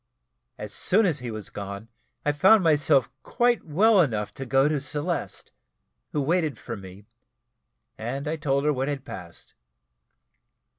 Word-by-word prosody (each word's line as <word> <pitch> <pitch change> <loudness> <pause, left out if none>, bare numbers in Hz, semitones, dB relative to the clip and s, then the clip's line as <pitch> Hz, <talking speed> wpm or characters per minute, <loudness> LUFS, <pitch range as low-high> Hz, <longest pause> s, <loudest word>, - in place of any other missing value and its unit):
As 105 -1 -7
soon 210 +4 +3
as 160 -7 0
he 125 -1 -5
was 110 -3 -7
gone, 100 +2 -7 0.4
I 145 - +3
found 190 +8 +5
myself 145 -4 +3
quite 240 - +1
well 200 +6 +4
enough 105 -9 -1
to 135 - -8
go 135 +2 +4
to 150 -2 0
Celeste, 150 +4 -4 0.6
who 145 - -1
waited 160 -3 0
for 115 - -6
me, 95 0 -12 0.9
and 135 +6 -4
I 155 - -1
told 140 -3 0
her 150 - +3
what 135 0 -2
had 140 -2 -3
passed. 85 -2 -10
140 Hz, 150 wpm, -25 LUFS, 115-160 Hz, 0.9 s, found